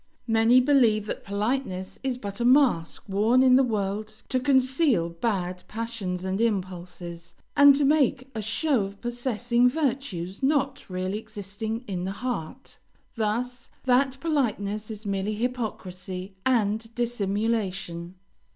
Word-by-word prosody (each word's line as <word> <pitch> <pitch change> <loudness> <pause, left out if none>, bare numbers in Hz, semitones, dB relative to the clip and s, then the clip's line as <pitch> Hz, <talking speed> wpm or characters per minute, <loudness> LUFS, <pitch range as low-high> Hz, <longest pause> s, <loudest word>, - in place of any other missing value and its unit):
Many 225 +2 +5
believe 245 -6 +4
that - - -5
politeness 200 -2 -2
is 265 -2 -1
but 200 -3 -6
a - - 0
mask 245 - +3
worn 220 +6 +3
in 255 -1 +6
the 265 - +6
world 215 -1 -3
to 255 - +1
conceal 260 - +2
bad 180 0 -2
passions 215 -5 -4
and 190 +3 -1
impulses, 180 -5 -3 0.2
and 285 -1 +8
to 285 0 +2
make 275 -3 +2
a 220 - -3
show 230 +3 +1
of 200 +1 -9
possessing 240 0 +1
virtues 245 - -2
not 275 -2 0
really 185 +2 -2
existing 220 +2 -5
in 180 -3 -3
the 190 - -3
heart; 250 +1 -5 0.4
thus, 240 +3 -2
that 260 +1 +3
politeness 215 -9 -1
is 215 0 -7
merely 200 +1 -1
hypocrisy 195 -6 -4
and 225 -2 +1
dissimulation. 200 -6 -2
220 Hz, 130 wpm, -26 LUFS, 195-255 Hz, 0.4 s, and